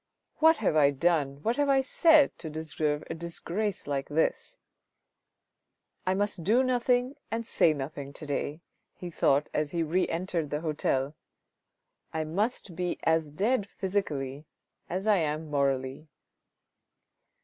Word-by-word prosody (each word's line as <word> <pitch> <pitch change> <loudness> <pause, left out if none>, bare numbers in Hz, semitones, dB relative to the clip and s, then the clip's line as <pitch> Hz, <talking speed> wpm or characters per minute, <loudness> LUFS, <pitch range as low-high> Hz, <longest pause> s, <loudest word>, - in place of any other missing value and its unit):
" - - -55
What 320 +1 +6
have 155 - +1
I 145 -2 +6
done, 145 -1 0
what 230 +2 0
have 290 -1 +2
I 270 -1 +5
said 310 +2 +4
to 160 - -5
deserve 155 -1 -2
a - - -4
disgrace 170 +4 -3
like 140 -1 -2
this? 160 - 0 0.5
" - - -56
" - - -38
I 185 - +2
must 200 -3 -1
do 230 +9 +4
nothing 250 0 +1 0.2
and 230 +1 -3
say 165 - +3
nothing 140 -1 -5
to 155 - -9
day," 145 +2 -3 0.3
he 175 -1 -7
thought 145 -2 +2
as 150 -1 0
he 165 +2 -1
re 175 +4 +1
entered 165 -2 -2
the 150 +1 -2
hotel. 145 -3 0 0.5
" - - -48
I 160 - 0
must 195 +3 -2
be 180 0 -2
as 160 -2 +2
dead 200 - 0
physically 150 -9 -3 0.4
as 185 +3 -3
I 215 -2 +4
am 155 -1 -2
morally." 135 +1 -1
165 Hz, 155 wpm, -29 LUFS, 150-205 Hz, 0.5 s, What